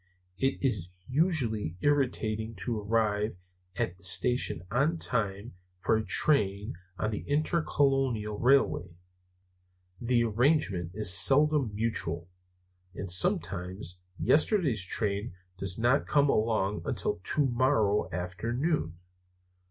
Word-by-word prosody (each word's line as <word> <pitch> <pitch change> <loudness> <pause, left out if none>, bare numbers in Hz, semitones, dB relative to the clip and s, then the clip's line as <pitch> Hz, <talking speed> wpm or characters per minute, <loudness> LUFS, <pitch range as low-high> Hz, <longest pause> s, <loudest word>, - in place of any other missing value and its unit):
It 135 0 +1
is 105 -10 -1 0.2
usually 125 - 0
irritating 115 -6 0
to 110 +3 -3
arrive 105 -1 0 0.4
at 90 -1 -2
the - - -18
station 95 -1 +2
on 145 +7 +1
time 105 -5 -1 0.3
for 110 - +2
a 110 - 0
train 105 -2 +1 0.2
on 110 - -1
the 105 - -3
Intercolonial 135 -8 0
Railway. 120 -10 +2 1.0
The 120 0 +2
arrangement 110 - +1
is 105 -4 +2
seldom 135 - +4
mutual; 90 -6 -2 0.6
and 95 -1 -5
sometimes 90 +1 -2 0.2
yesterday's 150 - +2
train 100 +2 -2 0.2
does 95 0 -1
not 120 +4 +2
come 145 -1 +3
along 110 -2 0
until - - -2
to 145 +6 +1
morrow 120 -5 +1
afternoon. 90 - -2
110 Hz, 105 wpm, -29 LUFS, 95-135 Hz, 1.0 s, seldom